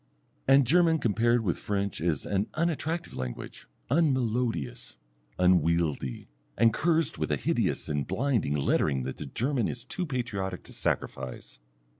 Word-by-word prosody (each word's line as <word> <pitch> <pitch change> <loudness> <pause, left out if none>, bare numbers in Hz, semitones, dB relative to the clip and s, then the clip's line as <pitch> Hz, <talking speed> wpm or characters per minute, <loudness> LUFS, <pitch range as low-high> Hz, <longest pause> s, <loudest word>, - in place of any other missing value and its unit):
And 135 0 +6
German 165 +4 +4
compared 120 -1 +2
with 90 -5 -1
French 100 -3 -2
is 80 -4 0
an 100 +1 0
unattractive 165 +1 -1
language; 65 -1 -6 0.2
unmelodious, 125 - 0 0.4
unwieldy, 85 -7 +2 0.3
and 115 +1 +5
cursed 165 0 +1
with - - -1
a - - +3
hideous - - 0
and 75 -2 -1
blinding 120 - 0
lettering 70 -1 +1
that 65 +1 -5
the 75 - -6
German 125 - 0
is 125 0 -5
too 180 +6 -3
patriotic 105 -9 -3
to - - -12
sacrifice. - - -3
110 Hz, 135 wpm, -28 LUFS, 80-135 Hz, 0.4 s, And